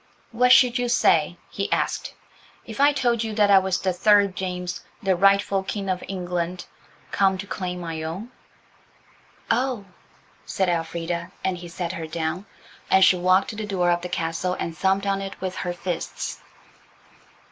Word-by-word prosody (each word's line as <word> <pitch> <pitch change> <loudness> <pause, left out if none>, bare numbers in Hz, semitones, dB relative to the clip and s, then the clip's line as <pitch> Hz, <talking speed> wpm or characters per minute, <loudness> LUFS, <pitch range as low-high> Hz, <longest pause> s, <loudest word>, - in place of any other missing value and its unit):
"What 250 +2 +3
should 250 -1 +6
you 245 -1 -1
say," 175 -8 +3
he 200 - -3
asked, - - -1 0.5
"If 220 +1 -9
I 290 +1 +6
told 240 -5 +1
you 220 -1 -4
that 205 -1 +4
I 195 - +8
was 190 -1 -1
the 185 -1 0
third 200 0 +4
James, 180 -2 -4 0.2
the 190 -1 +2
rightful 195 +1 +3
King 195 0 -4
of 185 - -3
England, 180 -1 -3 0.5
come 190 -1 +2
to 195 - -6
claim 185 -2 -4
my 165 -2 -5
own?" 180 +10 -6 1.2
"Oh!" 245 -3 0 0.6
said 190 -2 -1
Elfrida, 170 +1 -2
and 185 -2 -1
he 175 - -8
set 170 0 -4
her 165 -3 -5
down, 165 +4 -3 0.4
and 190 0 +6
she 185 - +5
walked 185 +7 +2
to - - -9
the 215 - -4
door 180 -3 +1
of 175 0 +1
the 180 - -5
castle 170 +2 -2
and 165 - -4
thumped 195 +3 +1
on 195 0 0
it 195 0 -7
with 185 -1 -4
her 180 - -2
fists. 175 -1 -4
185 Hz, 170 wpm, -24 LUFS, 175-200 Hz, 1.2 s, I